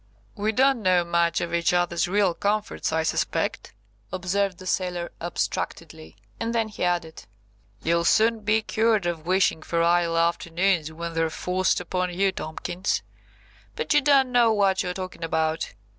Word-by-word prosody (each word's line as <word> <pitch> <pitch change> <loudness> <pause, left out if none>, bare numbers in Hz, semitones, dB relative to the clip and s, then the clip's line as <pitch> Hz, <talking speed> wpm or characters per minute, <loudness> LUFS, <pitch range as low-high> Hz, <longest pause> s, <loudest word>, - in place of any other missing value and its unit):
"We 210 +2 0
don't 265 +2 +3
know 185 -3 +3
much 170 0 +1
of 170 0 -4
each 170 0 +2
other's 175 -1 +1
real 195 -1 +2
comforts, 205 +2 -1
I 160 0 +1
suspect," 160 - -1 0.4
observed 185 +1 -1
the 185 - -11
sailor 180 -2 -2
abstractedly, 80 - -4 0.2
and 230 +1 -2
then 225 -1 +1
he 210 - -5
added– 175 -2 -2 0.6
"You'll 170 +1 +2
soon 225 +4 +3
be 215 +1 +1
cured 220 -4 +1
of 170 -2 -3
wishing 185 -3 +2
for 170 +1 0
idle 170 -1 +2
afternoons 170 0 +1
when 170 +1 -6
they're 165 0 +1
forced 185 +3 0
upon 180 0 -2
you, 190 +2 +1
Tomkins. 175 +3 -3 0.7
But 465 - -1
you 295 - +5
don't 270 -2 +4
know 240 -2 +4
what 195 -3 +2
you're 180 0 -3
talking 185 -2 -6
about. 160 -5 -1
180 Hz, 160 wpm, -25 LUFS, 170-205 Hz, 0.7 s, you